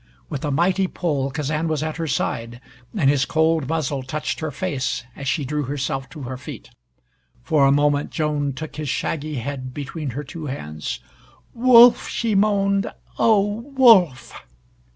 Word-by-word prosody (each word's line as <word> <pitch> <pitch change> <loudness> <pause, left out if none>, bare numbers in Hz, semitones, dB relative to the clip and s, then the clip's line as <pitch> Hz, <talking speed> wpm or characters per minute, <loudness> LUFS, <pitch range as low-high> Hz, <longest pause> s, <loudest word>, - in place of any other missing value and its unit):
With 140 - -5
a 150 - -1
mighty 180 +6 +2
pull 145 -7 -1
Kazan 150 +3 -2
was 155 -2 -1
at 155 0 -3
her 165 -1 -3
side, 120 -4 -2 0.4
and 150 -8 +2
his 140 -1 +3
cold 160 -3 +1
muzzle 150 -4 -1
touched 150 +4 -4
her 155 - -3
face 140 -6 -2
as 140 - -7
she 145 0 0
drew 150 +3 -2
herself 135 -1 -3
to 150 -2 -9
her 130 +1 -5
feet. 130 - -10 0.7
For 140 0 +3
a - - +4
moment 145 0 +2
Joan 150 -3 -1
took 155 +3 -8
his 150 -2 -3
shaggy 155 +2 -2
head 130 0 -5
between 145 +1 -5
her 145 - -3
two 155 +2 -7
hands. 75 - -5 0.5
"Wolf!" 240 0 +7
she 230 -2 -1
moaned. 200 -1 +2 0.3
"Oh, 205 -2 +3 0.2
Wolf!" 190 - +5
150 Hz, 160 wpm, -22 LUFS, 135-165 Hz, 0.7 s, Wolf